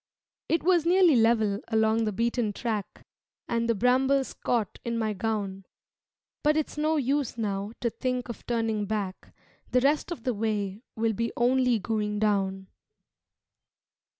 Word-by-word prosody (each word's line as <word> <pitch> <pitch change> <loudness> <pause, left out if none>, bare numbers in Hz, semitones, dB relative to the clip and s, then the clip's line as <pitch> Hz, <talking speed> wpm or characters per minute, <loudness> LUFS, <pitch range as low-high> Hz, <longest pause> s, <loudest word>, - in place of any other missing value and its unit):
It 330 - +1
was 350 -2 +4
nearly 350 -2 +5
level 225 -3 +3
along 220 0 +2
the 215 - 0
beaten 230 +1 0
track 215 -2 -4 0.4
And 235 0 0
the 230 - +3
brambles 260 +4 +2
caught 230 -5 -2
in 235 -1 -2
my 220 -2 0
gown 200 -2 -3 0.8
But 300 0 +3
it's 310 - -2
no 305 +1 +1
use 275 -2 0
now 205 -1 -2
to 235 - 0
think 250 +1 -2
of 235 - -8
turning 225 -3 0
back, 200 -3 -4 0.4
The 250 - +3
rest 290 +5 +1
of 250 -9 -5
the 250 - 0
way 205 -2 -2
will 225 0 +1
be 230 +2 -2
only 250 0 +3
going 210 0 -2
down. 195 -2 0
230 Hz, 150 wpm, -27 LUFS, 210-255 Hz, 0.8 s, nearly